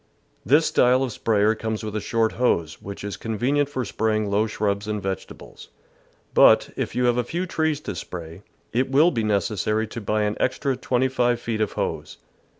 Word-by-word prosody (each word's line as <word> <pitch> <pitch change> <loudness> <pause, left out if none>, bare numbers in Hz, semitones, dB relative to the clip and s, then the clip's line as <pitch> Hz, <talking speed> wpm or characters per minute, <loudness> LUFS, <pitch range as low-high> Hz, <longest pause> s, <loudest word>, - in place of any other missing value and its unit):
This 145 - +4
style 125 +2 +3
of 130 - -2
sprayer 105 -1 +2
comes 110 0 -4
with 105 -1 -5
a 105 - -1
short 115 -5 +1
hose, 85 -10 0
which 100 0 -8
is 100 -1 -5
convenient 130 +6 0
for 130 -3 -3
spraying 110 -1 -1
low 105 +2 +2
shrubs 105 -1 -2
and 105 -1 -2
vegetables; 95 -2 -7 0.7
but, - - +6
if - - -3
you 125 - +1
have 120 0 +2
a 125 - +2
few 170 +9 -3
trees 160 -4 0
to - - -5
spray, 85 0 -8 0.3
it 130 +3 +1
will 150 +6 +5
be 115 -4 -1
necessary 105 +1 0
to 115 +1 -7
buy 105 +1 0
an 105 0 -1
extra 130 +1 0
twenty 125 0 0
five 120 -2 +1
feet 115 -2 -3
of 105 - 0
hose. - - -4
110 Hz, 190 wpm, -24 LUFS, 105-125 Hz, 0.7 s, but